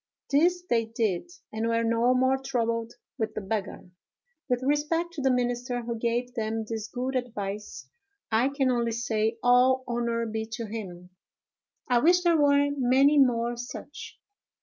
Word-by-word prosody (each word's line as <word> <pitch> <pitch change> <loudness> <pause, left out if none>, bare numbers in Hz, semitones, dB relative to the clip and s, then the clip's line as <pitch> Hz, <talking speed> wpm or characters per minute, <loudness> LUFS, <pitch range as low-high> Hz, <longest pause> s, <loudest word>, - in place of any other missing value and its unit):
This 350 +5 +3
they 230 -1 +2
did, 225 - -2 0.2
and 220 +1 -1
were 230 0 +1
no 230 +2 +2
more 260 +1 +2
troubled 230 -3 -2 0.3
with 220 -1 -2
the - - -3
beggar. 195 -2 -4 0.6
With 250 0 0
respect 305 +5 0
to 310 - -5
the 265 - +2
minister 245 -1 -1
who 235 0 -3
gave 240 +2 -2
them 225 -2 -2
this 220 -1 -4
good 255 +3 -4
advice, 210 -5 -4 0.4
I 230 +5 +3
can 275 -2 +1
only 235 -2 0
say, 225 -1 -1
all 250 +1 +4
honor 235 -1 -1
be 220 0 -4
to 230 +1 -4
him! 185 -5 -8 0.8
I 245 -1 +3
wish 355 +6 +4
there 340 -1 +4
were 285 0 +4
many 275 +3 +4
more 240 -2 +2
such! 245 +1 -8
240 Hz, 155 wpm, -27 LUFS, 225-260 Hz, 0.8 s, all